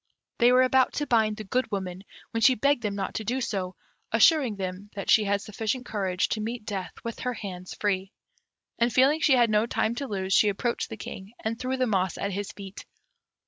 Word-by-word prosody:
They 240 +1 +6
were 255 +1 +6
about 260 0 +3
to 295 - -1
bind 220 -4 +2
the 215 - -6
Good 250 +6 -1
Woman, 190 -2 -4 0.3
when 230 - -2
she 255 +3 +6
begged 280 +3 +2
them 210 -2 -2
not 200 - -3
to 220 - -3
do 245 +5 -1
so, 190 -6 -3 0.4
assuring 280 -10 +4
them 190 +1 -5
that 195 - -1
she 215 - +5
had 200 0 +1
sufficient 220 +5 -3
courage 190 -5 -1
to 215 - -1
meet 230 0 -4
death 190 -5 -4
with 230 -1 -5
her 250 -1 -2
hands 185 -4 -7
free; 195 -2 -1 0.7
and, 235 +1 +3
feeling 270 +6 +4
she 280 - +5
had 240 -3 +4
no 215 +2 +3
time 230 - 0
to 280 - -3
lose, 190 -3 -2
she 210 +2 +5
approached 235 +4 -2
the 225 - -7
King, 195 +1 -8
and 225 +1 -2
threw 260 +1 -2
the 255 - +2
moss 190 -5 0
at 200 - -2
his 200 +1 -4
feet. 195 -1 -10
215 Hz, 220 wpm, -27 LUFS, 195-245 Hz, 0.7 s, They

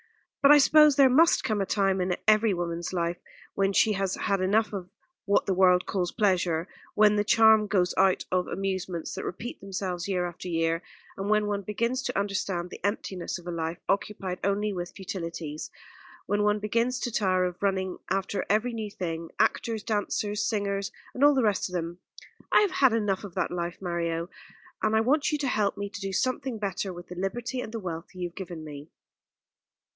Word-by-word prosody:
But 280 - +6
I 295 - +10
suppose 300 0 +6
there 270 -2 +6
must 325 +6 +5
come 215 -2 0
a - - 0
time 195 -2 +1
in 180 0 0
every 215 -1 +4
woman's 170 -1 -3
life 170 -1 -1 0.3
when 195 0 +1
she 215 +2 +4
has 195 -1 -1
had 195 -1 0
enough 210 +4 +2
of 185 -3 -5 0.4
what 200 - +2
the 195 - +1
world 180 -1 +4
calls 180 -3 -1
pleasure, 180 -5 +1 0.3
when 210 0 +5
the 205 - +2
charm 220 0 +5
goes 185 -3 +1
out 190 -1 +3
of 180 -1 +1
amusements 190 -3 -3
that - - -5
repeat 225 +7 -6
themselves 185 -2 -4
year 180 -2 0
after 175 +1 -8
year; 165 -1 0 0.3
and 195 +1 -4
when 215 0 +3
one 205 -1 -1
begins 235 +6 -1
to 270 - -2
understand 190 -3 -2
the - - -10
emptiness 195 -3 -2
of 175 - -14
a 175 - -4
life, 165 0 -3
occupied 195 -2 -2
only 205 +1 0
with 175 -1 -5
futilities, 170 -5 -5 0.6
when 205 +2 0
one 210 0 +3
begins 230 +4 0
to 240 - -2
tire 185 -4 +2
of 180 0 -5
running 190 -2 -1
after 195 +1 -1
every 220 +4 +1
new 220 -2 -4
thing, 165 -4 -5
actors, 225 -2 +1
dancers, 210 -1 -1
singers, 200 -2 -1 0.2
and 255 - -1
all 290 0 +7
the 260 - +2
rest 205 -4 +1
of - - -12
them. 170 0 -3 0.5
I - - +6
have 410 -3 +2
had 270 -10 +4
enough 210 -4 0
of 195 -4 -9
that - - -1
life, 175 0 -3
Mario; 170 -1 -2 0.5
and 220 0 +2
I 220 - +4
want 285 +7 +2
you 300 - +1
to 285 -2 -2
help 210 -5 0
me 200 - -3
to 205 +1 -7
do 195 0 -3
something 255 +3 -1
better 200 -1 -3
with 175 0 -10
the 180 - -7
liberty 235 +7 -3
and 220 - -7
the 225 - -4
wealth 175 -2 -6
you 180 -1 -3
have 170 - -29
given 175 -4 -7
me." 145 0 -9
195 Hz, 200 wpm, -27 LUFS, 180-215 Hz, 0.6 s, I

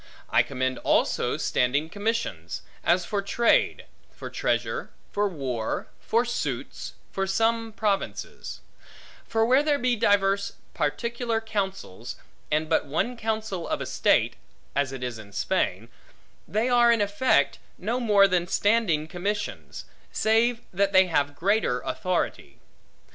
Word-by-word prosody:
I - - +6
commend 130 -1 -2
also - - +1
standing 140 +5 +1
commissions; 205 - -3 0.2
as 175 +1 +3
for 205 +1 -1
trade, 235 +4 +2 0.2
for - - -9
treasure, - - -1 0.2
for 205 0 +1
war, 130 -9 -3
for 235 +2 +1
suits, 240 0 -4 0.2
for 195 0 -1
some 225 +3 +1
provinces; 210 -2 -3 0.7
for 225 0 +2
where 255 +4 +5
there 295 -1 +2
be 250 -2 +1
divers 200 -1 +2 0.2
particular 235 - -1
counsels, 190 - -4 0.3
and 155 +1 +1
but 160 -2 +1
one 230 - -1
counsel 220 -5 -3
of - - -1
estate - - +2 0.4
(as 140 -1 +1
it 130 -1 -6
is 120 -3 -4
in 100 -2 -12
Spain), - - 0 0.6
they 220 +4 0
are, 240 -1 +5
in 230 - +3
effect, 210 +3 +2 0.2
no 230 +7 -1
more 205 -5 +5
than 180 -2 +1
standing 205 -7 +2
commissions: 200 +5 -4 0.3
save 225 +2 +2
that 200 +2 +1
they 190 0 +7
have 145 -4 0
greater 195 - +1
authority. 185 -1 -2
200 Hz, 130 wpm, -26 LUFS, 155-225 Hz, 0.7 s, they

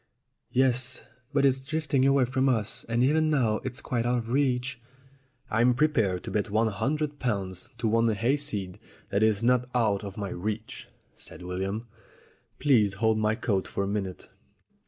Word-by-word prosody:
"Yes, 130 0 +1 0.3
but 140 -1 +3
it's 135 -1 +3
drifting 140 -1 0
away 135 -2 +4
from 130 +2 +1
us. 110 -5 0
And 120 +2 +2
even 155 +4 +3
now 120 -8 +2
it's 130 0 -4
quite 120 -2 -1
out 120 +1 +1
of 115 -1 -4
reach." 130 -2 0 0.7
"I'm 120 +3 +3
prepared 115 -11 +1
to - - -6
bet 105 -1 -1
one 110 +2 +2
hundred 145 +8 -2
pounds 95 -7 -2
to 115 -1 -1
one 115 +1 +3
hayseed 110 -4 -1 0.3
that 100 - +1
it 110 - +6
is 110 0 0
not 125 +1 +2
out 110 -4 +2
of 100 0 -7
my 100 -2 -3
reach," 105 +5 -5 0.3
said - - -11
William. 95 +5 -3 0.7
"Please 110 -9 +3
hold 110 +1 +2
my 105 0 +2
coat 100 -5 -1
for 100 - -2
a - - -2
minute." 100 -2 -3
115 Hz, 170 wpm, -27 LUFS, 105-130 Hz, 0.7 s, it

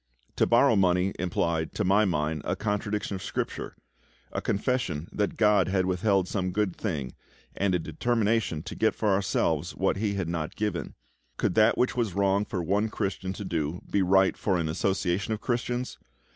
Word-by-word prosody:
To - - +3
borrow 120 +1 +5
money 90 -1 +2
implied, 85 -2 -1
to 110 - 0
my 100 +3 +4
mind, 75 -4 -1
a - - -1
contradiction 105 0 -2
of 95 - -4
Scripture - - -4 0.6
a - - -3
confession 100 - -1
that 105 -1 -1
GOD 105 -2 +4
had 95 -1 +1
withheld 95 +1 +1
some 95 -2 -1
good 95 -1 -1
thing, 75 - -3 0.4
and 95 -2 +1
a - - +4
determination 105 0 0
to 95 +3 -6
get 110 - +1
for 110 - 0
ourselves 85 -4 0
what 95 +1 +1
He 100 0 -1
had 95 -4 -2
not 80 -2 -3
given. 105 -5 -3 0.4
Could - - 0
that 110 +3 +4
which 125 - +1
was 115 -7 -1
wrong 100 +1 +2
for 95 -6 -3
one 100 +5 +1
Christian 95 -3 -3
to 100 - -6
do 80 -1 -2
be 100 - +2
right 95 +1 +4
for 95 -3 0
an 80 -2 -1
association 95 +4 0
of - - -10
Christians? 125 +1 -2
95 Hz, 180 wpm, -27 LUFS, 90-105 Hz, 0.6 s, borrow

